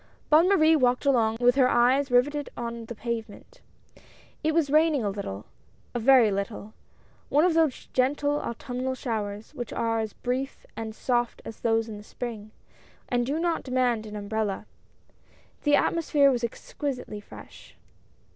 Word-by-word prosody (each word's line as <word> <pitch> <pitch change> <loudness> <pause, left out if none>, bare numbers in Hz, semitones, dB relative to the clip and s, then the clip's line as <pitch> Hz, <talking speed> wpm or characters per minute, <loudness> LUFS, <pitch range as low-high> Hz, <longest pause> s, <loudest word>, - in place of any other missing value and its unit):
Bonne 325 +4 +6
Marie 320 -5 +5
walked 250 -2 +2
along 225 -5 +3
with 245 0 +5
her 260 -1 +4
eyes 255 +4 +3
riveted 285 +4 +2
on 235 -1 -5
the 235 - -7
pavement. 235 - -6 0.8
It 315 - +2
was 310 -3 +1
raining 305 -4 +3
a 205 - 0
little 105 - -6 0.2
— - - -35
a 240 - -1
very 240 -2 +6
little 200 +2 -4 0.3
— - - -33
one 300 +4 +4
of 360 - +3
those 320 -5 +1
gentle 290 +3 +1
autumnal 250 +2 -4
showers 215 -2 -4
which 240 -6 -6
are 225 0 0
as 220 -2 -3
brief 260 +2 -4
and 220 -1 -6
soft 240 -1 -1
as 225 - -8
those 225 -1 +1
of 215 -2 -7
the 205 - -11
spring, 220 -2 -7 0.6
and 245 -1 0
do 285 +3 -1
not 340 0 0
demand 250 -4 0
an 210 - -8
umbrella. 210 -1 -2 1.0
The 290 0 +5
atmosphere 295 -4 +3
was 245 -2 -1
exquisitely 250 -1 -4
fresh. - - -14
245 Hz, 160 wpm, -26 LUFS, 225-285 Hz, 1.0 s, Bonne